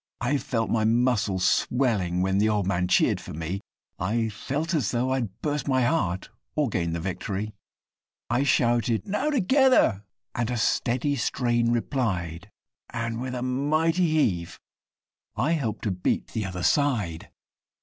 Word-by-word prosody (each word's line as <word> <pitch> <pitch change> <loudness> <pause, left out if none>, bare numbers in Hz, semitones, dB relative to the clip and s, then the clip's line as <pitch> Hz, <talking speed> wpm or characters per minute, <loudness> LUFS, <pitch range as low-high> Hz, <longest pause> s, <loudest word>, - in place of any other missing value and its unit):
I 135 +4 +1
felt 115 -4 -2
my 110 -2 +2
muscles 110 -5 +2
swelling 100 -9 +1
when 95 +1 +1
the 110 +1 +3
old 105 -3 +1
man 90 -2 0
cheer'd - - +3
for - - -9
me, 85 +5 -4 0.4
I 110 +5 0
felt 145 - -3
as 135 - +1
though 125 +2 0
I'd 120 -7 -2
burst 150 -3 -1
my 130 -2 +2
heart, 105 - 0 0.2
or 150 -4 +1
gain 85 -5 -1
the 85 - -2
victory! 100 +4 -4 0.7
I 120 +3 +1
shouted, 120 -4 +2
'Now! 210 +9 -1
Together!' 260 - +3 0.3
and 120 -1 -1
a 125 - -1
steady 125 +5 +1
strain 120 -1 +1
replied, 95 - -2 0.4
And, 115 0 -3
with 130 0 -4
a 125 - -3
mighty 155 +7 +1
heave, 100 - 0 0.8
I 155 - +1
helped 120 -10 -1
to 105 - 0
beat 90 -1 -1
the 110 -3 -3
other 90 -1 -5
side! 110 - +1
115 Hz, 150 wpm, -26 LUFS, 95-135 Hz, 0.8 s, the